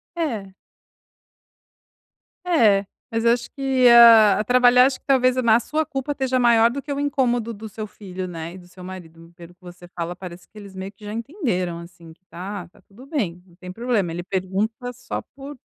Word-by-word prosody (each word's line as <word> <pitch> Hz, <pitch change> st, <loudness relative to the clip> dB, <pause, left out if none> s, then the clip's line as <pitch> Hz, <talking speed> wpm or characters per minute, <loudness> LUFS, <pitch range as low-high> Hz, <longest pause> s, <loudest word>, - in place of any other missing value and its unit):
É. 220 Hz, -, -3 dB, 1.9 s
É, 215 Hz, -, +3 dB, 0.3 s
mas 225 Hz, 0 st, -1 dB
eu 235 Hz, -, +6 dB
acho 240 Hz, -1 st, -4 dB
que, 265 Hz, -3 st, +2 dB
ah, 225 Hz, -3 st, +8 dB
trabalhar 250 Hz, +2 st, +5 dB
acho 270 Hz, -, -1 dB
que -, -, -45 dB
talvez 255 Hz, -2 st, +3 dB
na 235 Hz, -2 st, +4 dB
sua 310 Hz, +5 st, -2 dB
culpa 280 Hz, -1 st, -4 dB
esteja 260 Hz, -2 st, -1 dB
maior 235 Hz, -1 st, +5 dB
do 275 Hz, +3 st, -5 dB
que 285 Hz, -, -8 dB
o 280 Hz, -, -2 dB
incômodo 245 Hz, -5 st, 0 dB
do 220 Hz, +1 st, -9 dB
seu 215 Hz, +1 st, -7 dB
filho, 185 Hz, -3 st, -8 dB
né, 165 Hz, 0 st, -7 dB
e -, -, -10 dB
do 175 Hz, -1 st, -15 dB
seu 180 Hz, 0 st, -14 dB
marido, 165 Hz, -2 st, -11 dB
pelo 170 Hz, 0 st, -13 dB
que 180 Hz, -, -40 dB
você 175 Hz, 0 st, -13 dB
fala 175 Hz, 0 st, -5 dB
parece 180 Hz, -1 st, -10 dB
que 215 Hz, -, -19 dB
eles 200 Hz, -2 st, -11 dB
meio 190 Hz, +1 st, -6 dB
que 210 Hz, +1 st, -16 dB
já 210 Hz, -, -6 dB
entenderam, 225 Hz, -, -3 dB
assim, 170 Hz, -1 st, -13 dB
que 185 Hz, -, -33 dB
tá 185 Hz, +3 st, -7 dB
tá -, -, -24 dB
tudo 235 Hz, +7 st, -17 dB
bem, 205 Hz, -, -3 dB
não 175 Hz, -2 st, -22 dB
tem 180 Hz, 0 st, -10 dB
problema. 225 Hz, -5 st, -1 dB
Ele 175 Hz, +1 st, -5 dB
pergunta 200 Hz, +6 st, -3 dB
só 245 Hz, +1 st, -6 dB
por 280 Hz, 0 st, -10 dB
215 Hz, 200 wpm, -22 LUFS, 180-250 Hz, 1.9 s, ah